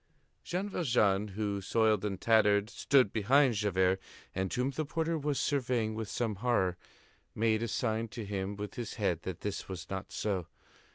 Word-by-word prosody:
Jean 185 +3 -2
Valjean, 110 - +2
who, 100 -2 -1
soiled 110 0 +2
and 100 -3 -2
tattered, 105 -1 +4
stood 130 -7 +3
behind 130 +5 +4
Javert, 95 -3 +1 0.3
and 95 0 -2
whom 125 +2 0
the 155 +3 -2
porter 165 +2 -1
was 145 -2 -1
surveying 125 -6 0
with 110 -2 -4
some 110 -4 -2
horror, 100 -6 +1 0.6
made 110 0 +2
a 115 - -1
sign 110 0 -1
to 115 0 -7
him 100 0 -3
with 105 0 -6
his 120 -2 -5
head 95 -7 0
that 95 -2 -6
this 100 -1 -4
was 90 -2 -7
not 95 0 -4
so. 95 -5 -2
110 Hz, 170 wpm, -32 LUFS, 100-125 Hz, 0.6 s, tattered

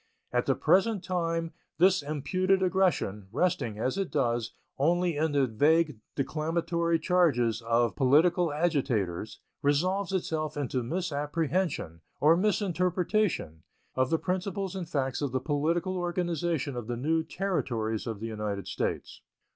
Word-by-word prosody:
At - - +1
the - - +3
present 195 +1 +2
time 165 -3 -1 0.2
this 185 +1 +4
imputed 185 +7 0
aggression, 180 - +1
resting, 125 -7 0
as 130 - -1
it 195 - -1
does, 120 -1 0 0.3
only 175 +3 +2
in 155 +1 +1
the 140 -2 +3
vague 150 +3 +2 0.2
declamatory 165 +3 0
charges 150 - +2
of 115 +1 +1
political 160 +5 +3
agitators, 130 - -1 0.2
resolves 180 +7 +1
itself 155 -5 -2
into 130 -3 -1
misapprehension, 155 - -2 0.2
or 155 +3 +5
misinterpretation, 180 - 0 0.3
of 130 0 +1
the 165 - +2
principles 190 +2 -2
and 180 -4 -5
facts 135 -4 -1
of 140 -3 -2
the 130 - +1
political 160 +6 0
organization 170 -5 -1
of 120 -3 -5
the 120 -1 -3
new 160 +6 +1
Territories 120 - -2
of 110 -3 -4
the 110 - -5
United 105 -3 -4
States. - - -3
160 Hz, 130 wpm, -29 LUFS, 130-180 Hz, 0.3 s, or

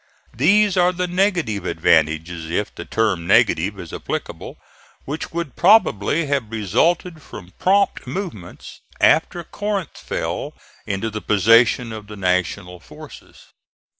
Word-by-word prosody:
These 195 - +3
are 180 0 +4
the 180 0 -2
negative 175 - 0
advantages, 80 0 0
if 105 +5 -2
the - - -8
term 100 -7 -1
negative 95 +5 +2
is 85 -3 -9
applicable, - - -6 0.5
which 150 +3 -5
would 170 -5 -5
probably 170 - +3
have 140 -6 -1
resulted 155 - 0
from 95 -8 -12
prompt 200 +1 +1
movements 170 - -7 0.2
after 175 - +2
Corinth 200 0 -4
fell - - -4 0.3
into 100 +3 -2
the 110 0 -5
possession 115 +3 +3
of 105 -2 -9
the 105 0 -10
National 90 -1 -1
forces. - - -14
115 Hz, 125 wpm, -20 LUFS, -, 0.5 s, are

